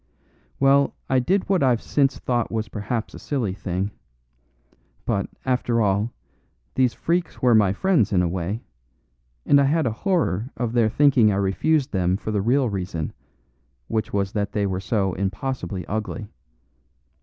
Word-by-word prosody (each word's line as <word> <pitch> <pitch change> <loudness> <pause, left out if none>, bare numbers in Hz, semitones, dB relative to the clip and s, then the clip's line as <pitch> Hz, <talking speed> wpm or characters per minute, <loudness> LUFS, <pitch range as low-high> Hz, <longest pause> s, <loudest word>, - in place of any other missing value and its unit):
"Well, 140 +1 +4 0.2
I 130 - +4
did 185 +10 +1
what 190 -2 +2
I've 125 -4 +3
since 135 0 +1
thought 120 -2 -1
was 110 -1 -2
perhaps 110 +2 -3
a - - -9
silly 120 -10 -2
thing. 95 +1 -3 1.1
But, - - -1 0.2
after 125 -2 +1
all, 105 +2 +1 0.6
these 130 -2 +2
freaks 170 +1 -1
were 125 -2 +5
my 105 -4 +5
friends 150 - +2
in 90 -3 +3
a - - +1
way; 95 +6 -3 0.8
and 140 0 +5
I - - +4
had 155 +3 +2
a 120 - +1
horror 125 - 0
of 120 -2 -2
their 115 -2 +3
thinking 130 -4 +4
I - - 0
refused 130 +10 +1
them 90 -1 +1
for 110 - -5
the 105 -2 0
real 125 +5 +2
reason, 90 -6 -3 0.8
which 110 -1 -1
was 100 -1 0
that 105 -2 -2
they 105 -1 +1
were 95 -1 -1
so 95 -1 0
impossibly 100 -1 -3
ugly. 110 0 -4
110 Hz, 160 wpm, -23 LUFS, 100-130 Hz, 1.1 s, were